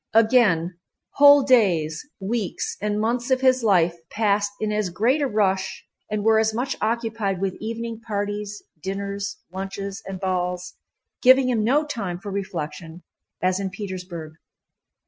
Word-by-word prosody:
Again 210 -7 +4 0.4
whole 285 0 +8
days, 180 - +3 0.2
weeks, 205 0 -2
and 210 0 -1
months 235 +3 -1
of 260 0 +2
his 260 -1 +3
life 175 -5 +3
passed 205 -1 +1
in 215 -1 -1
as 210 -3 0
great 235 - +1
a 280 - +2
rush 195 -4 0 0.2
and 210 -1 -2
were 220 0 +5
as 220 0 +1
much 260 +3 -1
occupied 220 -4 -1
with 190 -1 -1
evening 230 +1 -5
parties, 205 -1 -4 0.2
dinners, 200 +1 -4
lunches, 195 +2 -5
and 190 -1 -5
balls, 180 -1 -2 0.5
giving 260 0 +6
him 225 -4 +1
no 285 +7 +3
time 205 -12 -4
for 200 +1 -7
reflection, 175 -3 -5 0.4
as 185 +1 +2
in 195 -1 -2
Petersburg. 185 -5 -7
205 Hz, 145 wpm, -23 LUFS, 190-230 Hz, 0.5 s, whole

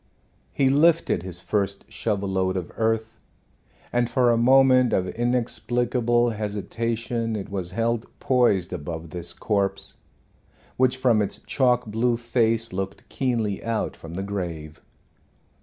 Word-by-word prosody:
He 135 -1 +2
lifted 165 - +3
his 90 -1 -6
first 100 +1 -1
shovel 100 -3 -2
load 95 -1 0
of 90 -2 -5
earth, 110 0 -1 0.7
and 120 -1 +1
for 125 -2 +3
a - - +3
moment 130 +1 +5
of 90 -1 +1
inexplicable 120 0 0
hesitation 115 +2 -2
it 100 - -5
was 95 -3 -3
held 115 +2 -1
poised 110 -9 +2
above 80 +1 -6
this 85 -2 -5
corpse, 100 -1 -2 0.8
which 130 0 +2
from 120 -4 +3
its 100 - -1
chalk 125 +2 +2
blue 115 +2 0
face 115 -2 0
looked 95 +1 -5
keenly 115 -7 -1
out 115 -1 -2
from 80 +1 -10
the 95 - -3
grave. 85 -6 -5
115 Hz, 130 wpm, -24 LUFS, 95-120 Hz, 0.8 s, moment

